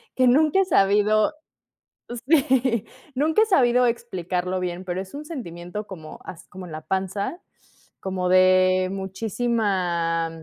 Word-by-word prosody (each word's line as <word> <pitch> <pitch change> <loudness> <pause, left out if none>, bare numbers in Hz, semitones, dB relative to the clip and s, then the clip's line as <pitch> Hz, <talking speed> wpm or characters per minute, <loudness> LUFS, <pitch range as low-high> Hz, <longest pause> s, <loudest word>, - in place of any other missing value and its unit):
que 255 -1 +3
nunca 305 +8 +4
he - - +1
sabido 210 - +3 1.0
Sí. 260 -7 +2 0.3
Nunca 310 +9 +2
he - - +1
sabido 250 - +3
explicarlo 185 -5 -3
bien, 180 0 -4
pero 180 +1 -3
es 190 0 -11
un 295 +1 -7
sentimiento 210 - -7
como 160 -5 -10
as 180 0 -10
como 185 0 -9
en - - -11
la 155 0 -6
panza, 195 - -3 0.6
como 185 -1 -2
de 185 0 +4
muchísima, 190 -5 -1
195 Hz, 130 wpm, -23 LUFS, 180-245 Hz, 1.0 s, nunca